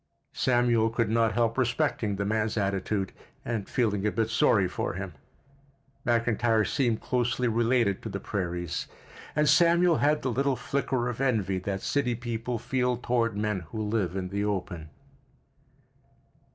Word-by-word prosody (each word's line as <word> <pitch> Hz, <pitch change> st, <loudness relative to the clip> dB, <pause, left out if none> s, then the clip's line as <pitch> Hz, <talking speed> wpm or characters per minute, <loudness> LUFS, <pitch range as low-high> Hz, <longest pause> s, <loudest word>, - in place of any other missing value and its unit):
Samuel 120 Hz, -3 st, +2 dB
could 115 Hz, -1 st, 0 dB
not 115 Hz, -1 st, +2 dB
help 115 Hz, +1 st, +1 dB
respecting 120 Hz, -4 st, 0 dB
the 100 Hz, +1 st, -2 dB
man's 110 Hz, +1 st, 0 dB
attitude, 100 Hz, 0 st, -1 dB, 0.3 s
and 115 Hz, -4 st, -3 dB
feeling 105 Hz, -5 st, 0 dB
a -, -, +1 dB
bit 115 Hz, 0 st, -1 dB
sorry 105 Hz, -4 st, +3 dB
for 90 Hz, -, -3 dB
him. 95 Hz, -1 st, -5 dB, 0.9 s
McIntyre 115 Hz, -2 st, +2 dB
seemed 120 Hz, -6 st, 0 dB
closely 125 Hz, 0 st, 0 dB
related 115 Hz, -3 st, +2 dB
to -, -, -6 dB
the -, -, -4 dB
prairies, 90 Hz, -3 st, -3 dB, 0.5 s
and 150 Hz, 0 st, +3 dB
Samuel 170 Hz, +2 st, +5 dB
had 150 Hz, +1 st, +2 dB
the 130 Hz, -, 0 dB
little 135 Hz, +3 st, +1 dB
flicker 125 Hz, 0 st, -1 dB
of 125 Hz, +1 st, -4 dB
envy 105 Hz, -8 st, +1 dB
that 95 Hz, +1 st, -4 dB
city 125 Hz, -4 st, 0 dB
people 120 Hz, 0 st, -3 dB
feel 125 Hz, +1 st, 0 dB
toward 115 Hz, -3 st, 0 dB
men 105 Hz, -2 st, 0 dB
who 110 Hz, -, -5 dB
live 105 Hz, -4 st, -1 dB
in 95 Hz, -1 st, -3 dB
the 100 Hz, +1 st, -2 dB
open. 90 Hz, -6 st, -3 dB
115 Hz, 150 wpm, -28 LUFS, 100-125 Hz, 0.9 s, Samuel